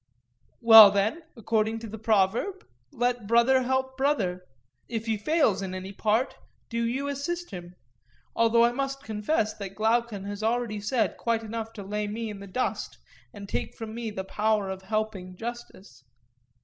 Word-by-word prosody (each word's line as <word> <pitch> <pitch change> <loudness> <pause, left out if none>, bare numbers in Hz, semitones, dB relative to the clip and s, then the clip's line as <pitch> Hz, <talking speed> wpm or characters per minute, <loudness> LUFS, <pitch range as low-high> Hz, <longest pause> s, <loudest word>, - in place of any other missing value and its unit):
Well, 225 -3 +11
then, 200 +11 0 0.2
according 220 0 0
to 230 - -6
the 220 +1 -8
proverb, 220 - +1 0.3
'Let 245 -2 -1
brother 235 +4 +4
help 260 +1 -1
brother'—if 180 - -3
he 225 -1 0
fails 255 - +1
in 190 -1 -4
any 190 +1 -6
part 220 +6 0 0.3
do 230 0 -2
you 270 +4 -2
assist 345 +5 -4
him; 175 -1 -9 0.6
although 230 0 +4
I 240 - +2
must 275 +2 -3
confess 215 +1 -1
that 195 -2 -8
Glaucon 225 -1 0
has 205 +1 -6
already 225 -1 -1
said 215 0 0
quite 230 -1 -1
enough 225 0 -5
to 205 - -8
lay 210 +2 -3
me 220 +1 -4
in 205 - -8
the 200 - -9
dust, 185 - -3 0.3
and 200 -1 -10
take - - -3
from 220 -1 -7
me 230 -1 -4
the 190 -2 -5
power 210 0 0
of 190 0 -6
helping 200 -2 -3
justice. 225 - -8
220 Hz, 160 wpm, -27 LUFS, 200-235 Hz, 0.6 s, Well